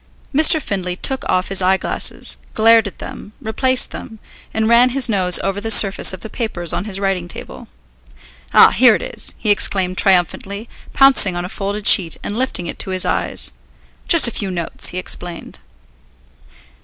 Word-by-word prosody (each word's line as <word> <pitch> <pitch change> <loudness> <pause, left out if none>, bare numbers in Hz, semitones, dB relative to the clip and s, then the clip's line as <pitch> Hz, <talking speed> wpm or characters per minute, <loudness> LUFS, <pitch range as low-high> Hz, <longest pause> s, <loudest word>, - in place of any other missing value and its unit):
Mr. 315 +2 +5
Findlay 185 -9 -4
took 265 +7 -3
off 185 0 -1
his 195 0 0
eyeglasses, 190 +1 +1 0.2
glared 225 0 +3
at 195 - -11
them, 210 - -11
replaced 255 +1 0
them, 220 - -10 0.3
and 220 0 -2
ran 235 +2 +4
his 255 0 +1
nose 185 -5 +1
over 195 +1 -3
the 225 - -5
surface 200 -2 +5
of 185 - -9
the - - -8
papers 205 -7 -4
on 185 - -4
his 195 -3 -4
writing 195 -3 -3
table. - - -10 0.8
"Ah, - - +6
here - - +4
it - - -5
is!" - - -7
he 210 - 0
exclaimed 185 -2 -1
triumphantly, 195 +3 0 0.2
pouncing 270 -9 +4
on 175 0 -5
a - - -8
folded 200 +1 -6
sheet 170 -4 +4
and 205 - -5
lifting 245 -7 -3
it - - -8
to - - -6
his 185 -1 -2
eyes. - - -2 0.6
"Just 335 -7 +7
a - - -4
few 200 -3 -3
notes," 170 -3 -1
he 180 - -4
explained. 175 -1 -6
200 Hz, 175 wpm, -16 LUFS, 185-225 Hz, 0.8 s, Just